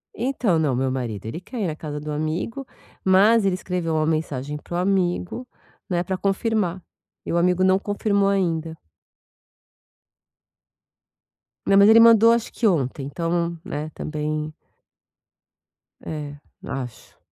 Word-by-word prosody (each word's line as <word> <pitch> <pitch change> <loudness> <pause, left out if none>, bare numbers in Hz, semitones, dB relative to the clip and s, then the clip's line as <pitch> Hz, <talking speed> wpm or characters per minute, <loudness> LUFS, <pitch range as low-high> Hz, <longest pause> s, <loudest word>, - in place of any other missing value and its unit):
Então, 240 -7 0
não, 145 -5 +1
meu 130 +1 0
marido 120 -6 -4
ele 115 +9 -5
quer 230 +5 -6
ir 195 - 0
na 155 - -3
casa 150 -1 -6
do 150 +1 -6
amigo, 160 - -3 0.4
mas 200 +4 +5
ele 190 -2 +2
escreveu 180 -3 -2
uma 155 0 +1
mensagem 150 -3 -2
para 175 - -8
o - - 0
amigo, 185 +5 -1 0.4
né, 175 -2 0
pra 190 +1 -3
confirmar. 195 -2 -1 0.4
E - - -3
o - - +2
amigo 180 +1 +2
não 185 0 +4
confirmou 200 0 0
ainda. 165 -5 -1 2.9
Meu 195 - +4
marido 200 +2 +7
ele 230 - +8
mandou 230 0 +7
acho 235 -1 0
que 235 - -3
ontem, 140 -7 0
então 170 +3 -2
né 155 -5 -5
também 155 0 -4 1.5
é, 150 -2 -6 0.3
acho. 125 -4 -7
175 Hz, 140 wpm, -23 LUFS, 150-195 Hz, 2.9 s, ele